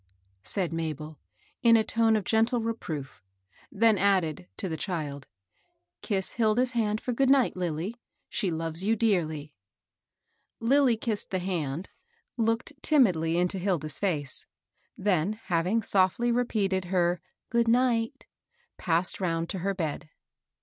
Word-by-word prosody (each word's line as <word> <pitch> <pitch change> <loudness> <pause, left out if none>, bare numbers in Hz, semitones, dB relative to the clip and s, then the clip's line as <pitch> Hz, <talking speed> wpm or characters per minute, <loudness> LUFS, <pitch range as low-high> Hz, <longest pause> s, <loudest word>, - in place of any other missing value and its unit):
said 180 - -1
Mabel, 155 -2 -4 0.4
in 230 -1 +6
a 220 - +3
tone 225 0 +2
of 215 - 0
gentle 225 +5 +2
re 230 0 -1
proof; 150 -10 -7 0.5
then 220 -1 +3
added, 180 - +1
to - - -3
the 160 - -3
child, 150 -4 -4 0.7
^^Eiss 195 -4 -2
Hil 220 -2 +2
da's 250 +1 +2
hand 215 -3 0
for 250 - -3
good 265 +2 +2
night, 270 -2 +4
Lilly. 180 +6 -3 0.3
She 200 -5 -1
loves 165 +1 -2
you 220 +3 +2
dearly." 160 -9 0 1.1
Lilly 255 0 +4
kissed 220 -2 -2
the 190 - -1
hand, 175 -3 -3 0.4
looked 230 +5 0
timidly 175 - +3
into 180 +2 0
Hil 185 -1 +1
da's 155 0 -6
face; 150 -9 -1 0.5
then, 190 -1 +1
having 185 +1 0
softly 195 +6 +2
repeated 205 -6 0
her 175 -1 +1
" - - -60
good 235 -1 +2
night," 235 -1 +1 0.5
passed 175 +3 +1
round 165 -2 -1
to 190 - -3
her 195 +2 -1
bed. 155 -3 -3
190 Hz, 145 wpm, -28 LUFS, 165-225 Hz, 1.1 s, in